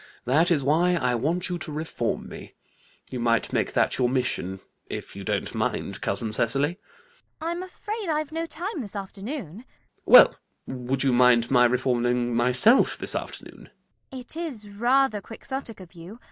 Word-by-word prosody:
That 155 +7 +3
is 155 -6 +2
why 170 +6 +2
I 125 -7 0
want 160 +10 -1
you 175 -1 -4
to 155 - -7
reform 150 -6 -3
me. - - -11 0.6
You 125 - -4
might 115 -1 +1
make - - 0
that - - +1
your 125 -1 +2
mission, 125 -7 -2 0.3
if - - -7
you - - -7
don't - - -2
mind, - - -3
cousin 105 +3 -1
Cecily. 140 - +1
CECILY. 480 - -31
I'm 340 +2 -3
afraid 415 +2 -6
I've 305 -1 -1
no 330 +1 -3
time, 345 +1 -5
this 210 -3 -9
afternoon. 200 - -6
ALGERNON. - - -36 0.4
Well, - - +9 0.3
would 130 +1 -3
you 135 -2 +2
mind 120 -1 +4
my 125 -2 +5
reforming 120 -1 0
myself 125 - +4
this - - +2
afternoon? - - -7 0.4
CECILY. 260 - -7
It 245 - -8
is 290 -11 -6
rather 240 +1 +1
Quixotic 235 +1 -7
of 185 -1 -13
you. 175 +7 -12
170 Hz, 170 wpm, -25 LUFS, -, 0.6 s, Well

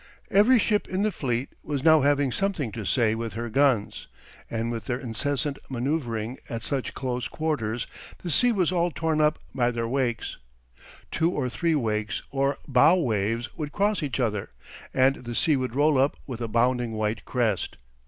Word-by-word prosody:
Every 215 +6 +6
ship 210 -1 +1
in 185 +2 -1
the 215 - +2
fleet 125 -6 -2
was 140 -3 -3
now 160 -2 +6
having 140 -1 +2
something 180 - -1
to 110 0 -6
say 115 +1 +2
with 115 -1 -4
her 115 +1 -4
guns; 135 -4 +1 0.4
and 115 +1 -2
with 115 -3 -5
their 120 - -1
incessant 140 +3 -1
manoeuvring 125 -3 -2
at 115 -1 -4
such 135 +2 -2
close 125 -2 -2
quarters 125 -8 -2 0.4
the 175 - -2
sea 245 - +6
was 185 -6 +1
all 175 -1 +2
torn 160 0 0
up 150 0 +3 0.2
by 120 -2 +2
their 115 -1 -2
wakes. 125 -1 -2 0.7
Two 165 +1 +2
or 140 -7 -1
three 165 +5 0
wakes 110 -5 -1
or 140 0 +1
bow 140 +5 +5
waves 115 - -1
would 150 -3 -4
cross 205 +1 +1
each 140 -3 -2
other, 105 -5 -1 0.4
and 130 +1 +3
the 120 -1 -7
sea 155 +2 +3
would 130 -2 -2
roll 145 -1 +4
up 135 +2 +2
with 125 -3 -6
a 115 - -1
bounding 120 +1 +1
white 110 0 -2
crest. 115 -6 -1
130 Hz, 180 wpm, -26 LUFS, 115-155 Hz, 0.7 s, Every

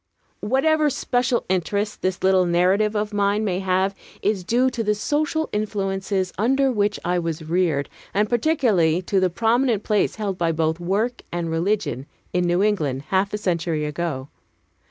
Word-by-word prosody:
Whatever 300 - +2
special 250 -2 0
interest 200 +3 -1
this 185 0 -2
little 190 -1 +4
narrative 190 +5 +2
of 210 0 -1
mine 205 +1 +1
may 185 -3 0
have 190 +1 +1 0.3
is 200 -3 0
due 245 +7 +2
to 235 -2 -2
the 210 0 +1
social 305 +7 -1
influences 195 -2 -1
under 270 +4 +2
which 205 -3 0
I 175 +1 +1
was 165 -2 -3
reared, 160 -4 +1 0.2
and 210 +1 +1
particularly 220 - +2
to 195 +2 +1
the 185 -1 +2
prominent 230 +3 +1
place 210 -2 +1
held 200 -3 -3
by 165 -1 +1
both 160 +1 0
work 205 +8 -1
and 170 -1 -2
religion 165 - -1 0.3
in 180 0 +1
New 175 +2 +2
England 150 -11 0
half 195 +1 +1
a 210 - -2
century 170 -6 -1
ago. 150 -3 -3
195 Hz, 160 wpm, -23 LUFS, 175-215 Hz, 0.3 s, little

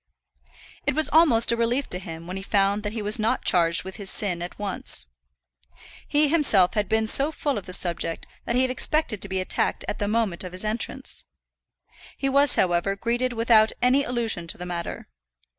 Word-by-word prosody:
It - - +1
was 315 0 +1
almost 290 -9 +4
a - - +2
relief 235 +4 0
to 180 - -1
him 165 -2 -8
when 180 +2 -6
he 195 - -5
found 200 +1 +1
that 210 0 -4
he 220 -2 -4
was 210 +3 +2
not 225 +4 -1
charged 170 -3 +3
with 190 0 -8
his 200 -2 -1
sin 180 -5 0
at 175 - -6
once. 205 -2 -4 1.0
He 295 +1 +3
himself 275 - +4
had 210 -2 -1
been 220 0 +1
so 275 +7 +2
full 290 -2 -2
of 200 -3 -6
the 185 - -2
subject 170 -2 0 0.2
that 235 - -2
he 255 - +3
had 260 - 0
expected 255 -4 +1
to 195 - -4
be 190 0 -1
attacked 185 - -1
at - - -4
the 205 - -1
moment 210 -5 0
of 180 -1 -8
his 185 +3 0
entrance. 215 +2 -2 0.9
He 275 - -1
was, 280 0 +3
however, 180 +2 +1
greeted 240 +4 -1
without 225 -1 +3
any 255 +3 +3
allusion 230 -9 -2
to - - -6
the 180 - -7
matter. 175 -1 -6
215 Hz, 200 wpm, -24 LUFS, 185-245 Hz, 1.0 s, almost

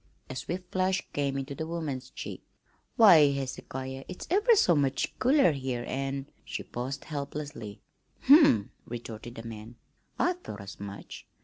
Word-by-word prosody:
A - - -6
swift 180 +6 -5
flush 185 0 +1
came 140 -1 0
into 135 +1 -4
the 160 +3 -4
woman's 145 -7 -4
cheek. - - -7 0.5
"Why, 175 - +8
Hezekiah, 135 0 -5
it's 180 - -7
ever 425 +5 +5
so 180 - +4
much 140 -2 +1
cooler 265 - +5
here, 130 -4 -3
an' 135 0 -2
" - - -36
she - - -5
paused 130 +3 -5
helplessly. 140 -7 -6 0.4
"Humph!" 260 - +6 0.2
retorted 120 0 -7
the 115 - -7
man, 115 +1 -9 0.4
"I 355 - +2
thought 355 - -9
as 100 -1 -9
much. 100 0 -8
140 Hz, 150 wpm, -29 LUFS, 125-175 Hz, 0.5 s, Why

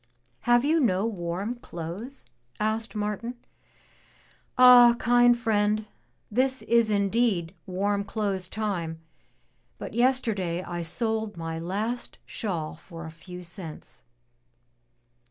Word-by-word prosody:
'' - - -41
"Have 240 +2 +5
you 320 +3 +3
no 200 -7 +2
warm 195 +1 -3
clothes?" 185 +10 -7 0.3
asked 220 +1 -1
Martin. 210 +3 -3 0.7
*' - - -33
Ah, 245 -1 +9
kind 245 0 +5
friend, 215 -2 +1 0.5
this 260 +3 +1
is 235 -1 +3
indeed 200 -4 +1
warm 200 +2 0
clothes 200 -4 -1
time, 180 -7 -3 0.8
but - - -7
yester 250 0 +2
day 180 -2 -2
I 175 -1 -4
sold 220 +4 -2
my 165 -1 -4
last 210 +8 -3
shawl 170 -9 -4
for 165 +1 -10
a 160 - -7
few 180 +2 -10
cents." 170 -2 -8
210 Hz, 120 wpm, -27 LUFS, 175-235 Hz, 0.8 s, Ah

